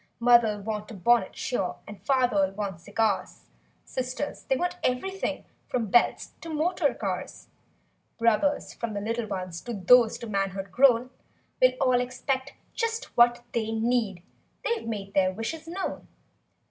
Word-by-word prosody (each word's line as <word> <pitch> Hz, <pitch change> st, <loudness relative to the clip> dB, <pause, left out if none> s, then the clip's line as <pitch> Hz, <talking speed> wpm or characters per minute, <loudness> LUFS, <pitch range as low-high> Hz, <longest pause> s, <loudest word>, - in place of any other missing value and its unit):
Mother'll 235 Hz, -3 st, +4 dB
want 210 Hz, 0 st, -4 dB
a 225 Hz, -, -8 dB
bonnet, 235 Hz, +6 st, +2 dB
sure. 220 Hz, -8 st, -2 dB
And 210 Hz, -1 st, -10 dB
father'll 245 Hz, -8 st, +2 dB
want 195 Hz, -4 st, -4 dB
cigars; 210 Hz, +1 st, -1 dB, 0.4 s
Sisters—they'll 260 Hz, +1 st, -3 dB
want 355 Hz, +2 st, -2 dB
everything 385 Hz, +10 st, -1 dB, 0.2 s
From 225 Hz, -5 st, -2 dB
belts 240 Hz, -, +3 dB
to 335 Hz, -, -8 dB
motor 315 Hz, -2 st, +1 dB
cars; 185 Hz, -3 st, -5 dB, 0.7 s
Brothers—from 230 Hz, -1 st, 0 dB
the -, -, -1 dB
little 230 Hz, +2 st, -2 dB
ones 185 Hz, -4 st, -5 dB
To 240 Hz, -1 st, -5 dB
those 230 Hz, +4 st, +5 dB
to 235 Hz, -1 st, -8 dB
manhood 195 Hz, -2 st, -2 dB
grown— 255 Hz, +1 st, +4 dB, 0.5 s
Will -, -, +6 dB
all 250 Hz, -1 st, +3 dB
expect 260 Hz, +2 st, -3 dB, 0.2 s
just 460 Hz, +1 st, -3 dB
what 240 Hz, 0 st, +5 dB
they 220 Hz, -1 st, -1 dB
need 225 Hz, -5 st, 0 dB, 0.4 s
They've 465 Hz, -, -1 dB
made 200 Hz, -3 st, -5 dB
their 185 Hz, -1 st, +3 dB
wishes 305 Hz, -, -5 dB
known. 370 Hz, +3 st, -4 dB
235 Hz, 135 wpm, -27 LUFS, 205-260 Hz, 0.7 s, Will